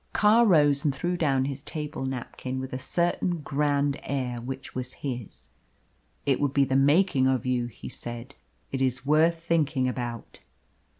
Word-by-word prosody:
Carr 225 Hz, +3 st, +5 dB
rose 145 Hz, -6 st, +5 dB
and 145 Hz, -3 st, +1 dB
threw 175 Hz, +6 st, -1 dB
down 135 Hz, -6 st, +1 dB
his 140 Hz, 0 st, -4 dB
table 150 Hz, -2 st, -4 dB
napkin 130 Hz, 0 st, -5 dB
with 130 Hz, 0 st, -6 dB
a 130 Hz, -, -3 dB
certain 175 Hz, +2 st, 0 dB
grand 145 Hz, -1 st, 0 dB
air 125 Hz, -3 st, -3 dB
which 130 Hz, +2 st, -6 dB
was 125 Hz, 0 st, -5 dB
his. 120 Hz, -, -5 dB, 0.8 s
"It 135 Hz, -2 st, +2 dB
would 145 Hz, -2 st, 0 dB
be 140 Hz, -, +5 dB
the 130 Hz, -, -1 dB
making 140 Hz, 0 st, +4 dB
of 130 Hz, -3 st, +1 dB
you," 125 Hz, -1 st, 0 dB
he 120 Hz, -, -10 dB
said. 120 Hz, +3 st, -7 dB, 0.4 s
"It 135 Hz, -, -2 dB
is 130 Hz, 0 st, 0 dB
worth 165 Hz, +3 st, +3 dB
thinking 150 Hz, -6 st, +1 dB
about." 120 Hz, -2 st, -5 dB
135 Hz, 165 wpm, -27 LUFS, 130-150 Hz, 0.8 s, Carr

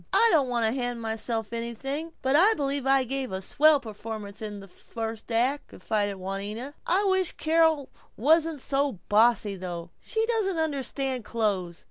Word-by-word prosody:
"I 460 Hz, -, +6 dB
don't 280 Hz, -5 st, +3 dB
want 235 Hz, -2 st, +1 dB
to 220 Hz, -, +2 dB
hand 245 Hz, -1 st, -2 dB
myself 225 Hz, 0 st, -3 dB
anything 270 Hz, +8 st, -4 dB
but 265 Hz, +1 st, +2 dB
I 395 Hz, +8 st, +6 dB
believe 280 Hz, -2 st, -2 dB
I'll 270 Hz, -1 st, +4 dB
give 265 Hz, 0 st, -3 dB
a 190 Hz, -, -2 dB
swell 295 Hz, +9 st, +4 dB
performance 215 Hz, -3 st, -7 dB
in 210 Hz, -2 st, -5 dB
this 195 Hz, -2 st, -13 dB
first 225 Hz, +2 st, -6 dB
act," 255 Hz, +5 st, +1 dB
confided 205 Hz, +1 st, -2 dB
Juanita. 200 Hz, +8 st, -5 dB
"I 380 Hz, +4 st, +3 dB
wish 380 Hz, -3 st, +1 dB
Carol 320 Hz, -3 st, +2 dB, 0.3 s
wasn't 315 Hz, +3 st, +3 dB
so 275 Hz, +1 st, 0 dB, 0.2 s
bossy 215 Hz, -1 st, +3 dB
though. 175 Hz, -2 st, -6 dB
She 445 Hz, -1 st, -1 dB
doesn't 435 Hz, -6 st, 0 dB
understand 275 Hz, -4 st, -1 dB
clothes. 200 Hz, -6 st, -1 dB
245 Hz, 160 wpm, -27 LUFS, 215-290 Hz, 0.3 s, I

